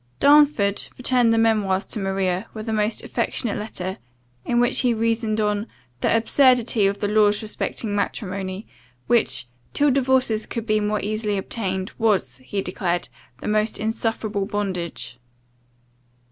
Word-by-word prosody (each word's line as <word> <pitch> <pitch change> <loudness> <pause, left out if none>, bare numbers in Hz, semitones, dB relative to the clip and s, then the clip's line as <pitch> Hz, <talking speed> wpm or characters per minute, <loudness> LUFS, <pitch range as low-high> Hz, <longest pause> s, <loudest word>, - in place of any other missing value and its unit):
CHAPTER 295 +1 +7
15 205 -9 0
DARNFORD 200 0 -5
returned 250 -2 +3
the 225 - +3
memoirs 210 -4 +2
to 215 - -4
Maria, 195 0 -1
with 215 0 -6
a 220 - -1
most 215 +1 -1
affectionate 230 -5 -1
letter, 190 -3 -5 0.4
in 240 - +1
which 245 0 +4
he 245 -2 +2
reasoned 225 -1 0
on 210 +1 0 0.3
"the 225 - +2
absurdity 240 -3 +3
of 200 +1 -1
the 205 - +1
laws 210 0 +3
respecting 210 0 -2
matrimony, 195 -1 -3 0.4
which, 235 - +2 0.3
till 290 0 +3
divorces 255 -4 +1
could 230 -2 -4
be 215 -1 +2
more 210 0 0
easily 210 0 -1
obtained, 190 -1 -3
was," 200 - +1
he 195 +10 -4
declared, 175 -1 -2 0.3
"the - - -5
most 215 +1 +1
insufferable 220 -2 -2
bondage." 185 - -4
215 Hz, 145 wpm, -23 LUFS, 195-230 Hz, 0.4 s, CHAPTER